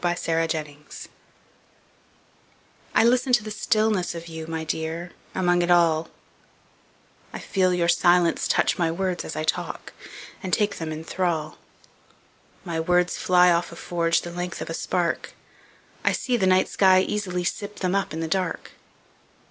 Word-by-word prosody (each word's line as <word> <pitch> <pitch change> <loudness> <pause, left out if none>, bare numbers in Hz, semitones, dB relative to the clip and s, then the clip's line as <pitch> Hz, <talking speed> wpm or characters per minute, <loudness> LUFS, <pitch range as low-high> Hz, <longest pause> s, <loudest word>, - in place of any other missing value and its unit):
Listening 165 -4 -1 2.1
I - - +6
LISTEN 250 +2 +2
to 240 -3 +4
the 215 - -6
stillness 215 -4 0
of 170 0 -7
you, 160 -1 -7
My 160 -1 -4
dear, 160 +2 -4 0.2
among 175 -1 +2
it 175 - -1 1.6
all;I - - -7
feel 185 -2 +1
your 175 -1 +1
silence 175 -1 +3
touch - - +1
my 170 -2 +2
words 180 +1 -2
as - - -6
I 155 - -2
talk, 155 - -3 0.5
And 185 - -5
take 205 +2 +1
them 160 -1 -4
in 155 +1 -6
thrall.My 165 0 -6
words 180 +2 +1
fly 180 -1 +5
off 170 0 0
a - - -9
forgeThe 170 0 -1
length 180 0 -4
of - - -5
a - - -3
spark;I 175 0 -4
see 250 - -1
the 195 -5 +2
night 185 0 +4
sky 185 -1 +4
easily 185 -3 -2
sip 205 +3 -3
themUp 190 +1 -1
in 160 +1 -4
the 165 - -2
dark. 180 0 -2
175 Hz, 140 wpm, -24 LUFS, 165-185 Hz, 2.1 s, I